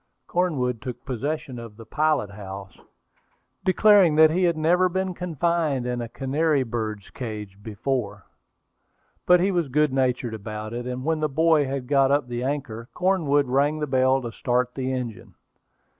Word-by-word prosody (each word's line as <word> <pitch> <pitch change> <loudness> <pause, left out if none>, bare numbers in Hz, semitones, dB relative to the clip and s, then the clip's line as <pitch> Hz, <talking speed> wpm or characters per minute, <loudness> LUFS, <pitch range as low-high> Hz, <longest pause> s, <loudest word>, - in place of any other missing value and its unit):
Cornwood 130 -10 -1
took 125 -2 -7
possession 135 +1 -3
of 115 -3 -10
the 115 - -11
pilot 150 -4 0
house, 95 -1 -9 0.8
declaring 190 -4 +5
that 155 0 +7
he 180 +3 +2
had 170 -2 +1
never 175 +4 +3
been 190 +1 -2
confined 170 -5 -1
in 125 -1 -2
a 115 - -5
canary 140 +3 0
bird's 110 -4 -4
cage 105 -5 -7
before. 115 +2 -3 1.0
But 180 -1 +6
he 195 +2 +2
was 175 -4 0
good 150 +1 +1
natured 125 -3 0
about 110 +1 -6
it, 120 +1 -4
and 125 +1 -4
when 160 0 +1
the 155 0 0
boy 160 +1 +3
had 135 -1 -3
got 135 0 +3
up 140 -2 +2
the 120 0 -4
anchor, 130 -4 -4
Cornwood 165 -7 +2
rang 140 +4 +2
the 150 - -1
bell 130 -1 +2
to 120 - -5
start 125 +2 -1
the 130 -1 -3
engine. 125 -5 -5
135 Hz, 165 wpm, -24 LUFS, 120-155 Hz, 1.0 s, that